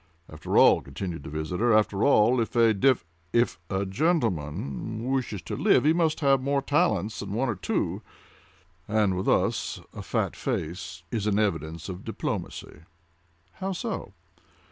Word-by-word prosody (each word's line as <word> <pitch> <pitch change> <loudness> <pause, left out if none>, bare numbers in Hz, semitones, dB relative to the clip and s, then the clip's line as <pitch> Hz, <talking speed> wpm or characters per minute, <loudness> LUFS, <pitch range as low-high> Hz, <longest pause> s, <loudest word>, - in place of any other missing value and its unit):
"After 80 0 -3
all," - - +7
continued 80 +4 -6
the - - -8
visitor, 90 +10 0
"after 105 -1 +1
all, 120 -2 +4
if 115 - -4
a 115 -2 +5
dev—if 95 -4 0
a 95 +1 -1
gentleman 110 - -1
wishes 125 -8 -2
to - - -4
live, - - +4
he 155 - +5
must 165 -2 +1
have 135 -2 +4
more 140 +1 0
talents 145 - +1
than 100 0 -5
one 125 +5 0
or 115 - 0
two; 95 - -2 0.9
and 105 -3 +2
with 95 - -1
us - - +1
a - - -7
fat - - -1
face 85 +1 -4
is 110 -2 -1
an 105 -1 +2
evidence 80 -5 -1
of 90 -2 -7
diplomacy." - - -5 0.8
"How 190 +1 -2
so?" 195 - -4
105 Hz, 150 wpm, -27 LUFS, 90-130 Hz, 0.9 s, all